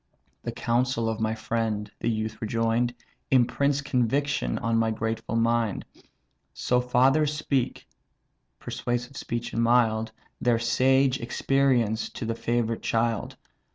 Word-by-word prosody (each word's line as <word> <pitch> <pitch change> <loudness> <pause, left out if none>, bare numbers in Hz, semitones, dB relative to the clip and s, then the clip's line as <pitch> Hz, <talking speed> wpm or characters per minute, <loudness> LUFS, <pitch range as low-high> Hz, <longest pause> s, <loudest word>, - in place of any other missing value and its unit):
"The - - -4
counsel 120 0 0
of 110 -1 -2
my 110 0 0
friend 110 -2 -2
(the 115 - 0
youth 110 -1 -3
rejoin'd) 115 +2 0 0.3
Imprints 140 +2 +2
conviction 140 +1 0
on 115 0 0
my 115 0 +2
grateful 110 +1 -3
mind. 115 -2 +1 0.7
So 125 0 +1
fathers 135 +5 +3
speak 145 -4 -1 0.7
(persuasive 120 +2 -3
speech 120 -2 -4
and 115 - 0
mild) 115 -2 +3 0.3
Their 120 -2 +3
sage 130 +3 +3
experience 120 -2 +1
to - - -5
the 115 - -1
favourite 115 0 -1
child. 115 -1 -1
115 Hz, 120 wpm, -26 LUFS, 115-125 Hz, 0.7 s, fathers